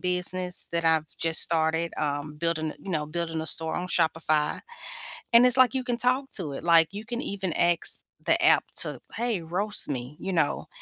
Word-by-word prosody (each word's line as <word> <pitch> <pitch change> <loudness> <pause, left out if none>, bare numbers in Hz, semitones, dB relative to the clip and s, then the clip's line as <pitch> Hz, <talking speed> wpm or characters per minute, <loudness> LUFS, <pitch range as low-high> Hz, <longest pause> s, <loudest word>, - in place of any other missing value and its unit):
business 180 0 +1
that 170 0 -1
I've 160 -2 +1
just 165 -1 +2
started, 165 0 0
um, 150 0 -3
building, 160 -1 -1
you 195 - -8
know, 155 -3 -1
building 165 0 -3
a - - -6
store 160 0 0
on 180 - -3
Shopify. 160 -3 0 0.7
And 235 +2 +8
it's 250 0 +5
like 255 -1 +5
you 260 -1 -1
can 245 -2 -2
talk 255 +3 0
to 160 -8 -4
it, - - -7
like 165 -2 +5
you 210 +2 -7
can 240 +1 -4
even 195 - -3
ask 170 -1 +2 0.2
the - - +3
app - - +6
to, - - -2
"Hey, 230 -5 -1
roast 190 +6 -1
me," 130 +1 -5
you 195 - -3
know? 165 -5 0
170 Hz, 195 wpm, -26 LUFS, 160-200 Hz, 0.7 s, And